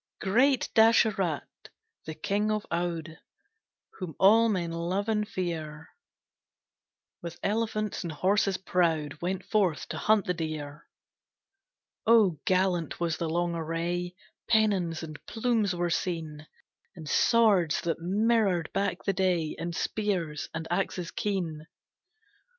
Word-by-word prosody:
Great 250 Hz, +7 st, +3 dB
Dasarath, 220 Hz, -7 st, +3 dB, 0.6 s
the 155 Hz, -, -5 dB
King 205 Hz, +2 st, -1 dB
of 215 Hz, -1 st, -1 dB
Oude, 170 Hz, -2 st, -3 dB, 0.8 s
Whom 180 Hz, -5 st, -6 dB
all 225 Hz, +4 st, +6 dB
men 175 Hz, -5 st, -1 dB
love 175 Hz, +5 st, -2 dB
and 210 Hz, -1 st, 0 dB
fear, 160 Hz, -5 st, -5 dB, 1.3 s
With 170 Hz, 0 st, -7 dB
elephants 215 Hz, 0 st, -1 dB
and 170 Hz, -, -4 dB
horses 190 Hz, +4 st, +1 dB
proud 165 Hz, -6 st, 0 dB
Went 185 Hz, +2 st, -2 dB
forth 190 Hz, -7 st, +1 dB
to -, -, -4 dB
hunt 215 Hz, -2 st, +3 dB
the 180 Hz, -, 0 dB
deer. 155 Hz, -3 st, -6 dB, 1.2 s
Oh 215 Hz, -8 st, +5 dB
gallant 185 Hz, -4 st, +1 dB
was 170 Hz, -2 st, -1 dB
the 165 Hz, -, -2 dB
long 175 Hz, +1 st, 0 dB
array! 170 Hz, +2 st, -3 dB, 0.3 s
Pennons 195 Hz, -8 st, +2 dB
and 155 Hz, -2 st, -9 dB
plumes 225 Hz, -5 st, 0 dB
were 175 Hz, 0 st, -1 dB
seen, 160 Hz, -4 st, -3 dB, 0.5 s
And 160 Hz, -3 st, -9 dB
swords 205 Hz, -4 st, +3 dB
that 165 Hz, -1 st, -2 dB
mirrored 195 Hz, -2 st, +1 dB
back 195 Hz, -2 st, -1 dB
the 195 Hz, -, 0 dB
day, 180 Hz, -4 st, 0 dB
And 170 Hz, 0 st, -4 dB
spears 180 Hz, -10 st, -2 dB
and 160 Hz, 0 st, -5 dB
axes 180 Hz, -1 st, -2 dB
keen. 170 Hz, -7 st, -3 dB
180 Hz, 120 wpm, -28 LUFS, 165-205 Hz, 1.3 s, all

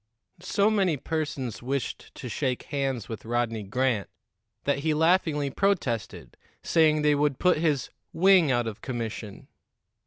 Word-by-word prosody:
So 200 Hz, +3 st, +2 dB
many 190 Hz, -7 st, +2 dB
persons 145 Hz, -6 st, -3 dB
wished 135 Hz, +2 st, -4 dB
to -, -, -7 dB
shake 130 Hz, +1 st, -2 dB
hands 135 Hz, -5 st, -1 dB
with 110 Hz, -, -7 dB
Rodney 115 Hz, -1 st, -1 dB
Grant 110 Hz, 0 st, -1 dB, 0.5 s
that 140 Hz, 0 st, +1 dB
he 155 Hz, +1 st, 0 dB
laughingly 160 Hz, -3 st, +2 dB
protested, 145 Hz, -, -1 dB, 0.3 s
saying 155 Hz, -2 st, +3 dB
they 150 Hz, 0 st, +4 dB
would 145 Hz, -2 st, +1 dB
put 180 Hz, -2 st, +3 dB
his 150 Hz, -5 st, 0 dB, 0.2 s
"wing 185 Hz, -4 st, +5 dB
out 120 Hz, -1 st, +1 dB
of 110 Hz, -2 st, -6 dB
commission." 115 Hz, -5 st, -5 dB
140 Hz, 135 wpm, -27 LUFS, 120-160 Hz, 0.5 s, wing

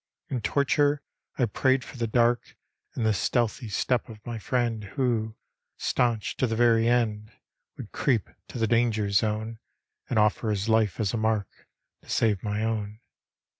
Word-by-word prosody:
In 125 Hz, -3 st, -2 dB
torture 145 Hz, +4 st, +2 dB, 0.3 s
I 125 Hz, -, +3 dB
prayed 130 Hz, +4 st, +1 dB
for -, -, -11 dB
the 115 Hz, -1 st, -1 dB
dark 120 Hz, +1 st, +1 dB, 0.4 s
And 115 Hz, -, -1 dB
the 110 Hz, -, +4 dB
stealdiy 115 Hz, +3 st, 0 dB
step 120 Hz, +4 st, 0 dB
of 105 Hz, -2 st, -12 dB
my 120 Hz, -2 st, -4 dB
friend 115 Hz, -2 st, -1 dB
Who, 115 Hz, -5 st, 0 dB, 0.4 s
stanch 120 Hz, -3 st, 0 dB
to 130 Hz, -, +2 dB
the 115 Hz, -, -1 dB
very 115 Hz, -1 st, +4 dB
end. 110 Hz, -3 st, +1 dB, 0.5 s
Would -, -, -8 dB
creep 120 Hz, -8 st, +1 dB, 0.2 s
to -, -, -8 dB
the 115 Hz, -, +2 dB
danger 110 Hz, -3 st, +1 dB
zone 110 Hz, +2 st, 0 dB, 0.5 s
And -, -, 0 dB
offer 110 Hz, +1 st, +2 dB
his 105 Hz, 0 st, -1 dB
life 110 Hz, -5 st, +2 dB
as 105 Hz, -3 st, 0 dB
a -, -, 0 dB
mark 110 Hz, -3 st, -2 dB, 0.3 s
To -, -, -20 dB
save 105 Hz, -5 st, +2 dB
my 105 Hz, 0 st, -2 dB
own. 110 Hz, -1 st, -2 dB
115 Hz, 165 wpm, -27 LUFS, 105-120 Hz, 0.5 s, the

